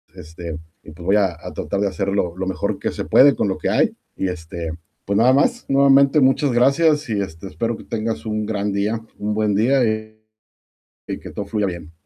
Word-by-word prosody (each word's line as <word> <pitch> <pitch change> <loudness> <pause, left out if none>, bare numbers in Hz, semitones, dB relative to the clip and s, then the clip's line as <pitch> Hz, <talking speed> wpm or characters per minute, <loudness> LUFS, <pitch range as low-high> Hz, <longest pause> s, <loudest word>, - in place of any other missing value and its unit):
Este, 85 -2 -8 0.2
y - - -12
pues, 85 +2 -12
voy 100 - +3
a 105 -2 +4
a 85 - -9
tratar 100 - -3
de 100 - +2
hacer 95 0 -2
lo 90 -4 -1
lo 95 - -3
mejor 95 - -2
que - - -2
se - - -5
puede 140 +1 +6
con - - 0
lo 95 - -1
que - - -2
hay - - +2 0.2
y, 95 - -1
este, 85 -2 -5 0.3
pues, 100 0 0
nada 120 +4 +5
más, 245 - +2
nuevamente, 140 +1 +5
muchas 135 +1 +3
gracias 145 +4 +3
y, 105 -2 0
este, 80 0 -7
espero 115 +4 -2
que - - -12
tengas 115 0 -3
un 110 -1 -2
gran 105 -1 -2
día, 105 +3 -1 0.2
un 105 +1 -2
buen 105 -1 +1
día 125 +6 +3
y 110 0 -3 0.9
y - - -3
que - - -10
todo 105 - -4
fluya 105 0 -1
bien. 85 -3 -6
105 Hz, 220 wpm, -21 LUFS, 95-125 Hz, 0.9 s, puede